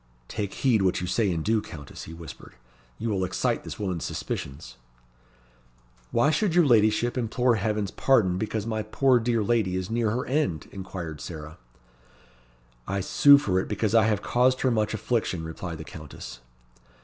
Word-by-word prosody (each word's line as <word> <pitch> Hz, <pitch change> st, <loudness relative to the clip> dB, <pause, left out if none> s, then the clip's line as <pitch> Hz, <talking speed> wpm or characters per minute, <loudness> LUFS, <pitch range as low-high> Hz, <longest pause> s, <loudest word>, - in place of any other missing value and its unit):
"Take 100 Hz, -3 st, -4 dB
heed 120 Hz, -6 st, +2 dB
what 95 Hz, -2 st, +2 dB
you 90 Hz, -, -3 dB
say 100 Hz, +2 st, +1 dB
and 80 Hz, -2 st, -2 dB
do, 110 Hz, 0 st, +2 dB
Countess," 75 Hz, -8 st, -9 dB
he 80 Hz, -, -9 dB
whispered. 80 Hz, -5 st, -11 dB, 0.4 s
"You 115 Hz, -, -3 dB
will 95 Hz, -2 st, 0 dB
excite 95 Hz, 0 st, -1 dB
this -, -, -7 dB
woman's 95 Hz, -5 st, -3 dB
suspicions." 70 Hz, -3 st, -5 dB, 1.3 s
"Why 130 Hz, +6 st, +3 dB
should 165 Hz, +3 st, +1 dB
your 175 Hz, -2 st, +6 dB
ladyship 115 Hz, 0 st, +3 dB
implore 120 Hz, 0 st, +1 dB
Heaven's 105 Hz, -1 st, -1 dB
pardon 95 Hz, -9 st, +2 dB
because 110 Hz, 0 st, -2 dB
my 110 Hz, -1 st, -2 dB
poor 125 Hz, +4 st, +3 dB
dear 115 Hz, -1 st, +1 dB
lady 105 Hz, -4 st, +1 dB
is 95 Hz, +2 st, -3 dB
near 115 Hz, -1 st, +1 dB
her 120 Hz, +4 st, -1 dB
end?" 130 Hz, -, -1 dB
inquired 90 Hz, -5 st, -7 dB
Sarah. 80 Hz, -2 st, -8 dB, 1.3 s
"I 100 Hz, +1 st, -1 dB
sue 140 Hz, +9 st, +6 dB
for 95 Hz, -10 st, +1 dB
it -, -, -3 dB
because 105 Hz, 0 st, -1 dB
I 110 Hz, -2 st, +5 dB
have 105 Hz, -2 st, 0 dB
caused 130 Hz, +1 st, +2 dB
her 130 Hz, -, +2 dB
much 110 Hz, -1 st, 0 dB
affliction," 110 Hz, -7 st, -1 dB
replied 80 Hz, +1 st, -6 dB
the 80 Hz, -, -7 dB
Countess. 75 Hz, -5 st, -10 dB
105 Hz, 170 wpm, -26 LUFS, 90-120 Hz, 1.3 s, your